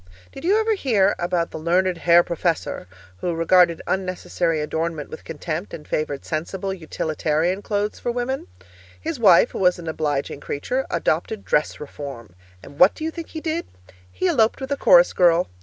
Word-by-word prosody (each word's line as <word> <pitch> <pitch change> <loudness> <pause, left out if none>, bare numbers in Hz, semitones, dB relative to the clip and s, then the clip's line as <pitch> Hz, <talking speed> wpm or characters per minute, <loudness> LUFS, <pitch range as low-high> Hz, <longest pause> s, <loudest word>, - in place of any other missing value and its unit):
Did - - -10
you 395 +6 +3
ever 440 0 +2
hear 215 - +2
about 175 -1 -1
the - - -6
learned 180 +3 +1
Herr 170 0 +5
Professor 170 - -2 0.3
who 170 - -2
regarded 170 0 +3
unnecessary 180 -3 -1
adornment 160 0 -3
with 155 - -9
contempt 165 +3 -5
and 150 - -12
favoured 145 -2 -2
sensible, 190 +5 -3
utilitarian 160 +1 -1
clothes 205 0 -2
for 240 - -2
women? 245 +2 -3 0.5
His 325 -4 -4
wife, 200 0 +6
who - - -5
was 180 -1 +3
an 170 -2 -9
obliging 145 -3 -2
creature, 250 - -3
adopted 170 +5 -1
'dress 150 - 0
reform.' 140 -8 -8 0.3
And 140 - -13
what 180 - +6
do - - -7
you 320 - -1
think 335 0 -8
he 315 - -7
did? 330 +1 -2 0.4
He 370 - -1
eloped 235 -10 +2
with 265 +1 -6
a - - +2
chorus - - +6
girl. 175 -1 +4
175 Hz, 175 wpm, -22 LUFS, 160-230 Hz, 0.5 s, wife